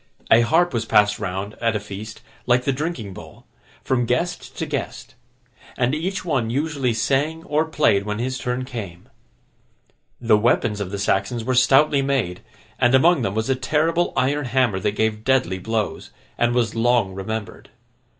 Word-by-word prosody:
A 115 - +7
harp 165 +7 +2
was 115 -1 -1
passed 105 -1 +3
round, 100 +1 -4
at 115 -2 +1
a - - 0
feast, 105 +2 -9 0.3
like 125 0 +3
the 140 - +1
drinking 130 - -4
bowl, - - -13 0.4
from 125 -2 0
guest 175 +9 -2
to - - -2
guest; - - -5 0.6
and 125 +2 +1
each 180 +5 -3
one 130 -9 0
usually 140 -1 -1
sang 145 +7 0
or 155 +1 0
played 150 -11 +2
when 105 +1 -3
his 130 +2 -3
turn 125 +2 -2
came. 100 -9 -8 1.1
The 115 -3 +3
weapons 110 -2 +1
of 95 - -3
the 100 - -4
Saxons 100 +4 0
were 130 +3 -1
stoutly 135 +3 +4
made, 135 -10 -1 0.4
and 125 0 +4
among 160 +3 +4
them 100 -4 -2
was 110 0 -1
a 135 - +2
terrible 160 +6 0
iron 140 +2 +1
hammer 125 -5 +1
that 100 +2 -1
gave 110 0 -1
deadly 120 -8 +1
blows, 110 +2 -3 0.3
and 120 0 +1
was 115 -3 +1
long 115 -4 +1
remembered. 105 +3 -6
120 Hz, 170 wpm, -22 LUFS, 105-135 Hz, 1.1 s, A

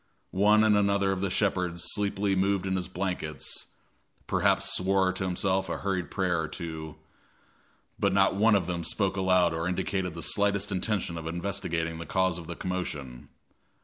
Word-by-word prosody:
One 105 +3 +4
and 110 -1 +4
another 100 -1 +2
of 95 -1 -2
the 100 - 0
shepherds 90 -3 0
sleepily 100 -1 0
moved 95 0 +1
in 95 0 0
his 90 -2 -2
blankets 90 -4 -3 0.6
perhaps - - +2
swore 95 0 +2
to 95 - -3
himself 95 0 0
a - - -2
hurried 95 -3 -2
prayer 90 -4 0
or 80 - -3
two 80 -1 -6 1.0
but - - +2
not 95 0 +4
one 105 +2 +4
of 95 -4 +1
them 85 -1 -3
spoke 95 +3 0
aloud 90 -3 +3
or 80 +1 -2
indicated 90 -1 -2
the 85 - -5
slightest 100 0 +1
intention 95 -3 -1
of 80 - -7
investigating 85 -2 -2
the 85 - -7
cause 95 -1 +1
of 85 - -10
the 85 - -5
commotion. 75 -10 -5
95 Hz, 170 wpm, -28 LUFS, 85-100 Hz, 1.0 s, One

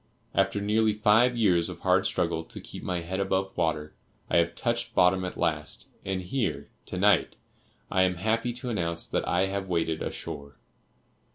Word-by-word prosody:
After 95 +1 +2
nearly 105 +1 +2
five 115 +4 +4
years 90 -7 +3
of - - -8
hard - - +3
struggle 80 - -1
to - - -9
keep - - -9
my 90 -2 -2
head 95 +3 -4
above 95 0 0
water, 75 -2 -1 0.4
I - - +4
have 85 0 +2
touched 120 0 -2
bottom 90 +1 +4
at 90 - -5
last, 75 -2 -2
and 95 -1 -2
here, 110 +6 -2 0.2
to - - -4
night, 105 +2 +3 0.6
I 95 - +3
am 90 -1 +3
happy 110 +6 0
to 125 +1 -5
announce 85 -5 -1
that - - -2
I 95 - +2
have 95 0 -3
waded 80 -2 0
ashore. 70 -1 -6
95 Hz, 175 wpm, -28 LUFS, 85-105 Hz, 0.6 s, five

